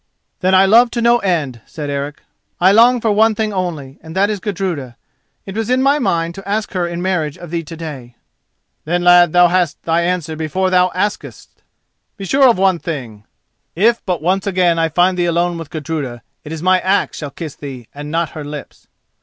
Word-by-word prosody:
"Then 185 +1 +2
I 190 +1 +6
love 235 +5 +5
to - - +2
no 235 0 +4
end," 155 - -1
said 150 -5 -6
Eric; 140 +1 -5 0.4
"I 185 +2 +5
long 240 +4 +5
for 220 - +1
one 220 +1 +3
thing 215 -1 -2
only, 160 -8 -4
and 160 +1 -11
that 200 +2 +2
is 210 - -3
Gudruda. 175 - -4 0.5
It 195 - -8
was 225 0 -2
in 255 +1 +2
my 280 +2 +3
mind 170 - 0
to 195 +2 -10
ask 210 +1 -1
her 180 -2 -1
in 170 +1 -5
marriage 170 -6 -1
of 175 -2 -10
thee 170 -1 -1
to 165 +1 -10
day." 135 -7 -8 0.7
"Then, 175 +3 -1
lad, 175 -1 +6
thou 175 +1 +6
hast 175 -3 0
thy 165 +1 +1
answer 170 -3 -2
before 160 +4 -1
thou 180 0 +4
askest. 205 +3 -4 0.6
Be 195 - -6
sure 270 +6 +4
of 235 - +2
one 190 -2 +2
thing: 125 - -6 0.5
if 230 +6 +2
but 175 -5 -2
once 190 +4 0
again 175 -3 +2
I 165 0 +1
find 180 +3 +2
thee 175 - +2
alone 170 0 0
with 165 -2 -8
Gudruda, 145 -7 -5 0.2
it 150 - -9
is 160 0 -6
my 185 0 +4
axe 190 +2 0
shall 145 - -5
kiss 155 0 -7
thee 130 -5 -9
and 145 +1 -8
not 165 0 -1
her 155 - -7
lips." 145 -1 -9
175 Hz, 210 wpm, -17 LUFS, 155-195 Hz, 0.7 s, I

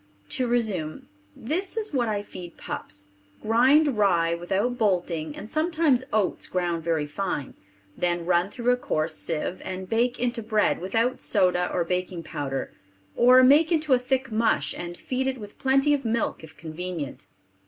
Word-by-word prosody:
To 255 - 0
resume: 210 -10 -1 0.3
This 365 - -3
is 430 -6 +1
what 245 -4 +1
I 205 -1 -1
feed 175 -4 -10
pups: 100 0 -6 0.4
grind 260 +3 +4
rye 170 -5 +3
without 195 +8 -1
bolting 175 -7 0
and 210 - -8
sometimes 310 -2 +1
oats 210 -3 0
ground 175 -2 -1
very 160 -2 0
fine; 150 -2 -3 0.4
then 175 -1 -1
run 175 +1 +2
through 240 +3 0
a 250 - +2
coarse 155 -8 -1
sieve, 165 +3 -3
and 185 0 -5
bake 240 +3 +1
into 240 -1 -1
bread 215 -4 +1
without 230 +7 0
soda 180 -3 +2
or 175 - +1
baking 180 0 -3
powder, 140 -3 -4 0.4
or 255 +2 +7
make 295 +6 +6
into 310 -4 +2
a 250 - +5
thick 265 0 -1
mush 215 -10 +1
and 175 0 -6
feed 265 +1 -2
it 265 -1 -1
with 205 -3 -11
plenty 270 +2 +3
of 280 -1 0
milk 230 -6 -1
if 160 0 -13
convenient. 165 -2 -6
205 Hz, 165 wpm, -25 LUFS, 175-250 Hz, 0.4 s, or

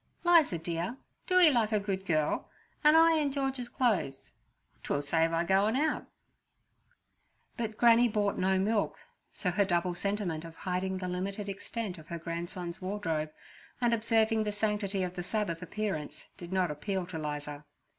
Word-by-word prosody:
"Liza 335 - +5
dear, 170 +8 -3 0.3
do 365 - +3
'ee 340 -4 +8
like 230 -4 +2
a 215 - +3
good 195 -1 -3
girl, 155 -2 0 0.3
'and 300 +1 +7
I 325 0 +6
in 295 -2 +1
George's 270 -3 -2
clo'es: 210 - 0 0.5
'twill 145 - -1
save 165 +3 +2
I 165 0 +1
goin' 195 +5 +3
out.' 300 +3 0 1.5
But 220 -3 -4
Granny 235 0 +6
bought 205 -2 0
no 190 +1 +2
milk, 210 +2 +1 0.3
so 180 - -1
her 200 +3 +3
double 175 -1 0
sentiment 180 -3 -2
of 165 -1 -10
hiding 185 +1 -2
the 185 -1 -4
limited 195 +3 -3
extent 200 -1 -5
of 155 - -14
her 170 - -4
grandson's 170 +2 -5
wardrobe 165 -6 -2 0.5
and 240 -1 +2
observing 225 -1 +2
the 210 - -1
sanctity 205 -2 -1
of 180 -1 -3
the 180 - -4
Sabbath 180 -3 -2
appearance 180 -6 -4
did 175 0 -10
not 185 -3 +1
appeal 180 +5 -3
to 170 -2 -6
'Liza. 150 -1 -5
190 Hz, 165 wpm, -30 LUFS, 170-220 Hz, 1.5 s, ee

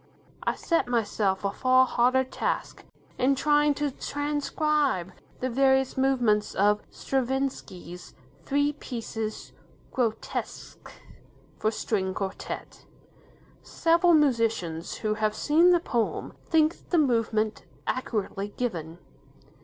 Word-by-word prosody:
I - - 0
set 335 -6 0
myself 205 -5 0
a 200 - +1
far 255 +4 +4
harder 255 +1 +3
task 260 - -3 0.3
in 270 +2 +3
trying 295 +1 +3
to 290 0 -1
transcribe 290 - -1 0.3
the 255 - 0
various 265 +1 +3
movements 245 -6 +2
of 210 +1 +3
Stravinsky's 255 -9 -3 0.3
"Three 285 +1 +1
Pieces 225 -5 -5 0.4
'Grotesques', 230 -4 -4 0.7
for 215 - +2
String 190 -4 -2
Quartet". 195 -1 -6 0.7
Several 335 +1 +3
musicians, 225 - +1
who 215 -1 -1
have 215 0 0
seen 320 +9 +4
the 350 -1 +5
poem, 240 -9 -2
think 320 +1 +1
the 350 - +2
movement 225 -6 +1 0.2
accurately 205 -5 -2
given. 170 -9 -3
250 Hz, 105 wpm, -27 LUFS, 215-285 Hz, 0.7 s, the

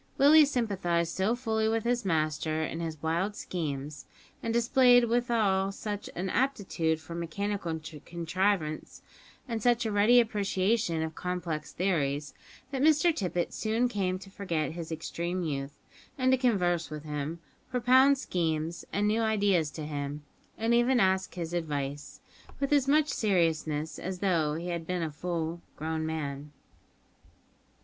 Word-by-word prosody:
Willie 300 +3 +7
sympathised 190 - 0
so 200 +5 +1
fully 220 -3 0
with 225 0 0
his 240 0 0
master 155 -2 0
in 165 - -4
his 160 -2 -4
wild 170 +6 0
schemes, 150 -6 -5 0.3
and 230 - -2
displayed 245 +1 +5
withal 225 -5 +1
such 205 0 -5
an 180 +3 -2
aptitude 185 - 0
for 165 +1 -9
mechanical 170 0 -3 0.2
contrivance, 170 -1 -2 0.4
and 230 -3 -3
such 240 +1 +2
a 220 - -1
ready 210 +4 +5
appreciation 205 -5 +1
of 160 0 -4
complex 170 -4 -4
theories, 150 -6 -1 0.4
that 270 -2 -2
Mr 310 +2 +4
Tippet 180 -3 -2
soon 225 +3 +1
came 190 -5 -1
to 195 +1 -13
forget 165 -8 -2
his 165 0 -7
extreme 170 +3 -3
youth, 140 -2 -4 0.4
and 255 -1 +3
to 260 - +5
converse 180 -9 +1
with 150 -1 -7
him, 150 +2 -4 0.3
propound 260 +3 +5
schemes 165 - -2
and 205 +1 +1
new 220 +2 +2
ideas 205 -7 +2
to 155 0 -7
him, 145 0 -4 0.3
and 225 +1 +1
even 240 +2 +4
to 230 - +5
ask 190 0 +1
his 170 -1 -4
advice; 145 -4 -4 0.4
with 275 +1 0
as 280 -2 +3
much 305 +1 +4
seriousness 160 - 0
as 185 +1 -4
though 170 -6 +1
he 170 +2 -4
had 170 -2 -4
been 180 -2 -1
a 160 - -3
full 170 +1 -3
grown 160 +1 -3
man. 145 -2 -4
180 Hz, 150 wpm, -29 LUFS, 160-225 Hz, 0.4 s, Willie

